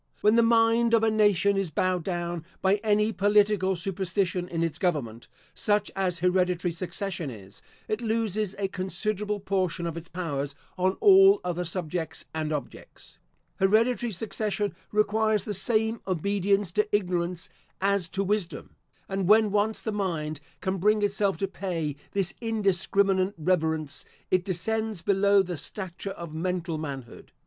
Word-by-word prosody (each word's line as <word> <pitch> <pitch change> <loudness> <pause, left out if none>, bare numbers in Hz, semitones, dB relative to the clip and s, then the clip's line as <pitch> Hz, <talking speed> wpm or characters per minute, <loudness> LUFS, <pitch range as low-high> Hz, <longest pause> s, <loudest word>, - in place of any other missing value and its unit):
When 210 - +5
the 235 - +6
mind 230 0 +4
of 225 - +2
a 220 - +3
nation 200 -2 +3
is 195 -3 0
bowed 180 +3 0
down 175 -2 -3 0.2
by 195 +2 +3
any 210 +1 +1
political 205 -2 +3
superstition 185 0 -2
in 165 -1 -1
its 165 -2 -2
government, 135 - -2 0.3
such 205 0 0
as 185 -2 0
hereditary 180 0 +1
succession 180 -1 -4
is, 100 -4 -11 0.3
it 215 +2 -2
loses 215 -3 -1
a 200 -1 0
considerable 205 +2 -2
portion 185 -3 -1
of 165 -1 -3
its 170 0 -7
powers 145 -5 -3 0.2
on 185 +1 +1
all 390 -1 +7
other 180 0 -2
subjects 165 -2 -4
and 155 -1 -2
objects. 150 -2 -7 0.4
Hereditary 225 +4 +2
succession 205 +1 -2 0.2
requires 215 -1 +2
the 210 - -3
same 220 +3 0
obedience 195 +1 +1
to 210 +2 +1
ignorance, 180 -3 -1 0.3
as 195 -2 +1
to 195 +2 -1
wisdom; 190 - -3 0.3
and 195 -2 -2
when 215 0 +5
once 210 +2 +1
the 220 - -2
mind 165 -7 -2 0.2
can 190 0 -1
bring 210 +3 +3
itself 200 -1 +1
to 195 - -1
pay 170 -7 -3 0.2
this 195 -3 0
indiscriminate 200 -3 +1
reverence, 160 -3 0 0.3
it 185 -1 +3
descends 210 +2 -2
below 200 +1 +4
the 175 -2 -5
stature 185 +4 -6
of 170 -4 -7
mental 170 -1 -2
manhood. 135 -6 -7
190 Hz, 145 wpm, -27 LUFS, 175-210 Hz, 0.4 s, all